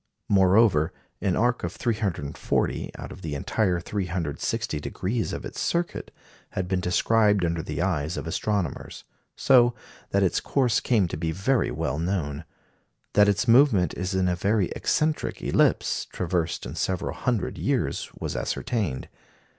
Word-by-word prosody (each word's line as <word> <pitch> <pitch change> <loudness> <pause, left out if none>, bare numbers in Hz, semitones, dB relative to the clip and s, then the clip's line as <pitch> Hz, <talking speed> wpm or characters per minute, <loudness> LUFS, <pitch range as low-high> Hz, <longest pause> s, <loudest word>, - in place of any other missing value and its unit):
Moreover, 95 -4 +4 0.3
an 95 -2 +1
arc 120 +2 +1
of 85 0 -3
340 100 - -1
out - - -8
of - - -10
the 75 -3 -4
entire 90 +5 0
360 85 -5 -2
degrees 105 +9 -2
of - - -5
its - - -7
circuit 170 0 -1 0.4
had 95 - -2
been 95 0 0
described 105 +2 +3
under 85 -1 -1
the 85 0 -3
eyes 85 -3 -1
of - - -4
astronomers; 90 -1 -2 0.3
so 120 -2 +5 0.3
that 100 0 +2
its 95 - +2
course 125 -5 +1
came 110 -7 +2
to 85 - -5
be 80 0 -1
very 110 +9 +1
well 75 -2 -2
known. 80 -4 -2 0.7
That 105 0 +6
its 105 +5 +1
movement 115 -7 +5
is 95 +2 -2
in 95 -1 +2
a 90 - +1
very 100 +1 +1
eccentric 155 0 0
ellipse, - - +2
traversed 85 -2 -2
in 65 - -6
several 90 +2 -2
hundred 120 -6 -2
years, - - -1
was - - -4
ascertained. 100 - -2
95 Hz, 145 wpm, -26 LUFS, 85-110 Hz, 0.7 s, That